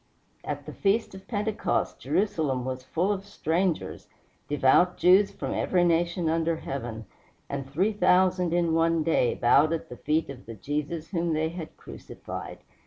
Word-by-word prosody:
At -, -, -5 dB
the -, -, -8 dB
feast 205 Hz, +2 st, 0 dB
of 190 Hz, 0 st, -12 dB
Pentecost 210 Hz, -1 st, -1 dB
Jerusalem 155 Hz, -11 st, 0 dB
was 130 Hz, 0 st, -4 dB
full 175 Hz, +9 st, -1 dB
of 195 Hz, -1 st, -2 dB
strangers, 180 Hz, -3 st, -2 dB, 0.4 s
devout 145 Hz, +5 st, +3 dB
Jews 190 Hz, +3 st, +5 dB
from -, -, -5 dB
every 180 Hz, -2 st, +1 dB
nation 170 Hz, 0 st, +1 dB
under 165 Hz, +1 st, +1 dB
heaven, 120 Hz, -7 st, -5 dB, 0.4 s
and 135 Hz, -1 st, -5 dB
three 185 Hz, +10 st, +1 dB
thousand 185 Hz, -2 st, +3 dB
in 170 Hz, -1 st, +1 dB
one 165 Hz, 0 st, +2 dB
day 155 Hz, -6 st, +2 dB
bowed 145 Hz, +6 st, +4 dB
at 165 Hz, -, -4 dB
the 125 Hz, -, -9 dB
feet 155 Hz, +2 st, 0 dB
of 130 Hz, -3 st, -12 dB
the 115 Hz, -, -7 dB
Jesus 150 Hz, -, -4 dB
whom 170 Hz, -3 st, 0 dB
they 155 Hz, +1 st, 0 dB
had 165 Hz, -1 st, -8 dB
crucified. -, -, -8 dB
165 Hz, 160 wpm, -27 LUFS, 145-185 Hz, 0.4 s, Jews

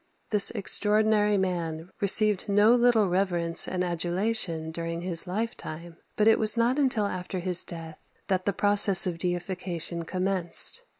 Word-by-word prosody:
This 210 Hz, -2 st, +6 dB
extraordinary 210 Hz, 0 st, +2 dB
man 175 Hz, -2 st, -4 dB
received 205 Hz, 0 st, +2 dB
no 205 Hz, +3 st, +4 dB
little 240 Hz, -4 st, +2 dB
reverence 175 Hz, -2 st, 0 dB
and 180 Hz, -1 st, -3 dB
adulation 175 Hz, -1 st, -1 dB
during 165 Hz, +1 st, -5 dB
his 175 Hz, -1 st, -1 dB
lifetime; 175 Hz, -5 st, -6 dB, 0.2 s
but 210 Hz, -, +1 dB
it 225 Hz, -, +4 dB
was 215 Hz, +1 st, +2 dB
not 240 Hz, +4 st, +1 dB
until 255 Hz, -7 st, 0 dB
after 185 Hz, -1 st, -5 dB
his 180 Hz, 0 st, +1 dB
death 165 Hz, -2 st, -9 dB, 0.3 s
that 185 Hz, -2 st, -2 dB
the 200 Hz, -, +1 dB
process 200 Hz, -1 st, +2 dB
of 175 Hz, -2 st, -4 dB
deification 175 Hz, -1 st, -3 dB
commenced. 185 Hz, -, 0 dB
185 Hz, 140 wpm, -26 LUFS, 170-210 Hz, 0.3 s, This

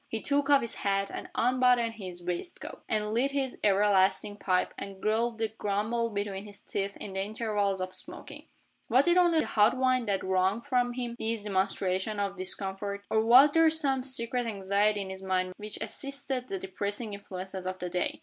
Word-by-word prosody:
He 225 Hz, -, -2 dB
took 285 Hz, +3 st, 0 dB
off 280 Hz, -1 st, +6 dB
his 235 Hz, -, -1 dB
hat, 195 Hz, 0 st, 0 dB
and -, -, -6 dB
unbuttoned 250 Hz, -1 st, +3 dB
his 185 Hz, -5 st, -8 dB
waistcoat, 180 Hz, -, -5 dB
and 215 Hz, -1 st, 0 dB
lit 250 Hz, +5 st, +2 dB
his 275 Hz, -2 st, -2 dB
everlasting 200 Hz, 0 st, +3 dB
pipe, 185 Hz, -3 st, 0 dB
and 195 Hz, -1 st, -8 dB
growled 225 Hz, +2 st, 0 dB
and 220 Hz, 0 st, -2 dB
grumbled 215 Hz, +2 st, -1 dB
between 200 Hz, -1 st, -3 dB
his 205 Hz, -1 st, -12 dB
teeth 200 Hz, 0 st, -4 dB
in 195 Hz, -, -7 dB
the 190 Hz, -, -1 dB
intervals 205 Hz, -2 st, -1 dB
of 185 Hz, 0 st, -4 dB
smoking. -, -, -7 dB, 0.4 s
Was 260 Hz, +6 st, +4 dB
it 345 Hz, -, +5 dB
only 345 Hz, -3 st, +4 dB
the -, -, -2 dB
hot 220 Hz, +4 st, +3 dB
wind 255 Hz, -2 st, +2 dB
that 195 Hz, -2 st, 0 dB
wrung 190 Hz, +3 st, +1 dB
from 245 Hz, -2 st, 0 dB
him 240 Hz, -1 st, -4 dB
these 225 Hz, -1 st, -1 dB
demonstrations 190 Hz, 0 st, 0 dB
of 200 Hz, -1 st, -1 dB
discomfort? 195 Hz, +1 st, -2 dB
Or 220 Hz, 0 st, +3 dB
was 255 Hz, +6 st, +7 dB
there 325 Hz, +1 st, +5 dB
some 275 Hz, -5 st, +2 dB
secret 245 Hz, -2 st, +1 dB
anxiety 205 Hz, 0 st, +1 dB
in 190 Hz, -1 st, -5 dB
his 190 Hz, 0 st, -7 dB
mind 185 Hz, -1 st, -1 dB
which 210 Hz, 0 st, -6 dB
assisted 275 Hz, -2 st, -5 dB
the 195 Hz, -, -3 dB
depressing 200 Hz, +4 st, -4 dB
influences 190 Hz, -1 st, -6 dB
of 185 Hz, 0 st, -3 dB
the 180 Hz, -, -4 dB
day? 180 Hz, 0 st, -2 dB
210 Hz, 190 wpm, -29 LUFS, 195-245 Hz, 0.4 s, was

